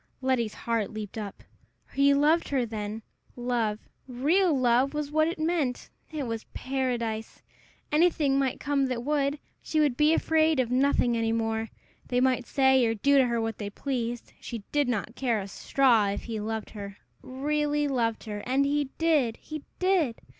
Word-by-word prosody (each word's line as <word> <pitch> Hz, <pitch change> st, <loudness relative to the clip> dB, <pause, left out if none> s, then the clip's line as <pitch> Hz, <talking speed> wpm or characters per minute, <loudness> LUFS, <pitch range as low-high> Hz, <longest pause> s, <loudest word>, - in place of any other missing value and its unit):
Letty's 255 Hz, -5 st, 0 dB
heart 230 Hz, -3 st, -1 dB
leaped 215 Hz, -2 st, -7 dB
up. 205 Hz, -2 st, -7 dB, 0.5 s
He 280 Hz, +1 st, +4 dB
loved 310 Hz, +4 st, +3 dB
her, 265 Hz, -3 st, +1 dB
then! 215 Hz, -1 st, -5 dB, 0.3 s
Love, 240 Hz, -4 st, -1 dB, 0.3 s
real 310 Hz, +9 st, +2 dB
love, 255 Hz, +1 st, +2 dB
was 295 Hz, -1 st, -3 dB
what 310 Hz, +1 st, +3 dB
it 335 Hz, -, -3 dB
meant! 315 Hz, -6 st, -1 dB, 0.2 s
It 300 Hz, -3 st, -3 dB
was 225 Hz, -2 st, -4 dB
paradise! 240 Hz, -4 st, -3 dB, 0.5 s
Anything 300 Hz, -3 st, +3 dB
might 265 Hz, -2 st, 0 dB
come 280 Hz, -2 st, +1 dB
that 245 Hz, -2 st, -3 dB
would! 285 Hz, 0 st, 0 dB, 0.2 s
She 310 Hz, -, -1 dB
would 290 Hz, -5 st, +3 dB
be 300 Hz, +3 st, +4 dB
afraid 320 Hz, -2 st, +2 dB
of 245 Hz, -2 st, 0 dB
nothing 255 Hz, -2 st, +2 dB
any 225 Hz, -1 st, 0 dB
more. 225 Hz, -1 st, -1 dB, 0.4 s
They 245 Hz, -, +1 dB
might 255 Hz, -1 st, +1 dB
say 265 Hz, -2 st, +4 dB
or 225 Hz, -, 0 dB
do 280 Hz, +6 st, +4 dB
to 260 Hz, -, +4 dB
her 235 Hz, -1 st, 0 dB
what 225 Hz, -1 st, -3 dB
they 205 Hz, -2 st, -4 dB
pleased 240 Hz, +1 st, -4 dB
she 230 Hz, -3 st, -6 dB
did 290 Hz, -2 st, +2 dB
not 230 Hz, -2 st, -2 dB
care 240 Hz, -5 st, 0 dB
a 195 Hz, -, -5 dB
straw, 230 Hz, +1 st, +2 dB
if 200 Hz, -, -3 dB
he 225 Hz, -2 st, -4 dB
loved 220 Hz, +1 st, -4 dB
her 200 Hz, -2 st, -8 dB, 0.2 s
really 295 Hz, +2 st, -1 dB
loved 235 Hz, -5 st, -1 dB
her! 210 Hz, -2 st, -5 dB
And 270 Hz, +2 st, +2 dB
he 290 Hz, +1 st, +1 dB
did! 300 Hz, -9 st, +2 dB
he 310 Hz, -2 st, -8 dB
did! 360 Hz, -11 st, +1 dB
255 Hz, 175 wpm, -27 LUFS, 225-290 Hz, 0.5 s, He